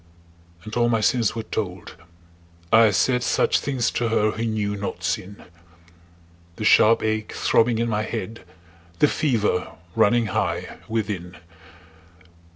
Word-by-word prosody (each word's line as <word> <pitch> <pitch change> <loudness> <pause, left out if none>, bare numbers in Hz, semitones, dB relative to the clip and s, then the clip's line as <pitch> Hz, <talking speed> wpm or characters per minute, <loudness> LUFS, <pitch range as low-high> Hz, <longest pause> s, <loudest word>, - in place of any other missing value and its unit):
And 110 - -8
all 120 0 +2
my 115 -1 +2
sins 115 +1 +1
were 115 - -4
told; 90 -5 -5 0.8
I 115 0 +7
said 125 +5 +1
Such - - +2
things 130 -5 -1
to 120 - -1
her 110 -1 +2
who 110 - -4
knew 105 -2 -2
not 100 0 -5
sin 100 +2 -3 1.1
The 110 - -6
sharp 110 +1 +5
ache 110 0 -2
throbbing 115 0 +2
in 115 +1 0
my 105 -2 -1
head, 110 -1 -5 0.5
The 150 - +4
fever 110 -12 0 0.2
running 120 +2 +3
high - - -2
within. 100 -6 -4
110 Hz, 135 wpm, -23 LUFS, 105-115 Hz, 1.1 s, I